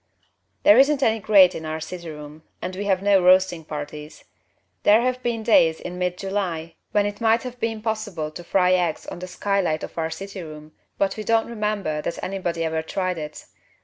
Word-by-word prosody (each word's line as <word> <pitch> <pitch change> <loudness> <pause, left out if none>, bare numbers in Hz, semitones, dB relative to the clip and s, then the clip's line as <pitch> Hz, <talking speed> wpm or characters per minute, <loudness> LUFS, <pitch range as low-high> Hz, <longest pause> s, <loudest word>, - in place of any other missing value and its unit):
There 210 +4 +7
isn't 275 0 +4
any 225 -2 +2
grate 195 -3 +6
in 160 - -6
our 155 0 -4
city 170 +1 -7
room 150 0 -10 0.2
and 185 - -5
we 200 +2 -4
have 190 -1 +1
no 200 -2 +4
roasting 180 -2 +4
parties. 150 0 -8 0.6
There 215 +3 +5
have 255 +1 -1
been 235 -2 -2
days 165 -8 +4
in 180 0 -7
mid 180 0 -1
July 185 -5 -3 0.2
when 205 -1 +2
it 205 +2 -4
might 225 0 +3
have 250 -1 -7
been 225 -2 -3
possible 210 -9 -3
to 175 +3 -9
fry 180 +1 +3
eggs 175 -3 0
on - - -7
the 185 - -6
skylight 185 -3 -1
of - - -7
our 160 0 -1
city 195 +2 -7
room, 155 -1 -10 0.3
but 195 +1 0
we 215 - -4
don't 225 +1 +2
remember 210 -9 -2
that 170 - -4
anybody 180 -3 -2
ever 160 0 -1
tried 185 +1 -2
it. 150 0 -8
185 Hz, 200 wpm, -23 LUFS, 160-210 Hz, 0.6 s, There